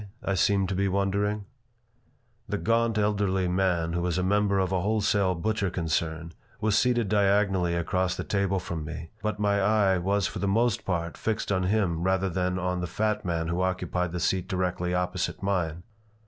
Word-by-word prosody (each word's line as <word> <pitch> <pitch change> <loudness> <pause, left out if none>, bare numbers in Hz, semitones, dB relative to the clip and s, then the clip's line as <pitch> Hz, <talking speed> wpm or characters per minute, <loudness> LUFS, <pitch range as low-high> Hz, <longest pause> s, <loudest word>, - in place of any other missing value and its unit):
I 100 - 0
seemed 100 0 +2
to - - -1
be 100 +1 +1
wondering 100 +2 0 1.0
The 105 - -1
gaunt, 115 +1 +1
elderly 100 -3 +1
man, 90 -2 +1
who 85 - 0
was 90 0 -1
a 90 - 0
member 100 +1 +2
of 95 -1 +1
a 95 -2 +1
wholesale 100 -2 +1
butcher 100 +2 -1
concern, 80 -1 -2 0.3
was 110 -1 +1
seated 120 -1 +2
diagonally 100 -3 +2
across 90 +2 0
the - - -4
table 100 -1 0
from 85 -3 -4
me, 80 +2 -7
but 110 -1 -2
my 100 -1 +1
eye 100 -2 +3
was 100 +2 +1
for - - -3
the 100 - -1
most 115 +2 +1
part 85 -2 -2
fixed 110 -2 -2
on 95 -2 +1
him 95 -5 +1
rather 95 +1 +1
than 90 +1 -1
on 90 0 -1
the 90 - -2
fat 105 +3 -1
man 85 -2 -1
who 85 +2 -1
occupied 90 -1 -1
the 90 - -3
seat 95 +1 0
directly 90 -1 -1
opposite 90 +2 -2
mine. 90 -4 -1
95 Hz, 185 wpm, -27 LUFS, 90-100 Hz, 1.0 s, eye